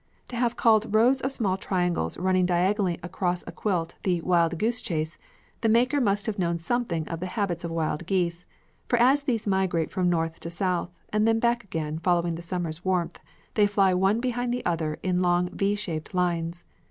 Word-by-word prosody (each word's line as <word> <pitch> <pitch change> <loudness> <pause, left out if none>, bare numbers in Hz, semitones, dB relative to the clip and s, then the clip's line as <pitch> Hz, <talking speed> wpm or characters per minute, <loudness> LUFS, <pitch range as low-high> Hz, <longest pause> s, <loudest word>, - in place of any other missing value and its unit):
To 245 - -6
have 240 0 0
called 220 -2 +3
rows 250 +4 +4
of 265 - -1
small 200 -8 +1
triangles 180 - -1
running 185 0 +2
diagonally 180 +1 +1
across 180 0 -1
a - - -7
quilt 175 -6 -2
the 180 -3 +1
"Wild 170 -1 +2
Goose 230 +6 +1
Chase," 160 -2 -2 0.5
the 225 - +2
maker 250 +6 +3
must 205 -3 +1
have 220 -3 -3
known 170 -1 +1
something 170 -3 -1
of 165 - -4
the 185 - -3
habits 185 -3 -2
of 170 - -3
wild 165 0 -2
geese, 175 -3 -1 0.4
for 245 - +2
as 260 +5 +4
these 240 -6 -1
migrate 190 -5 0
from 180 -1 +1
North 165 -1 -1
to 170 - -5
South 180 0 -1 0.2
and 225 +1 +3
back 235 +1 +1
again 160 -5 -4
following 170 0 +1
the 165 - -6
summer's 170 -1 -4
warmth, 180 -2 -1 0.3
they 210 -2 +4
fly 195 -2 +3
one 195 +4 +2
behind 245 0 -1
the 245 0 -3
other 160 -3 -1
in 180 -1 +1
long 180 0 +2
V 200 +1 0
shaped 170 -4 -4
lines. 170 -1 -1
185 Hz, 190 wpm, -26 LUFS, 170-215 Hz, 0.5 s, rows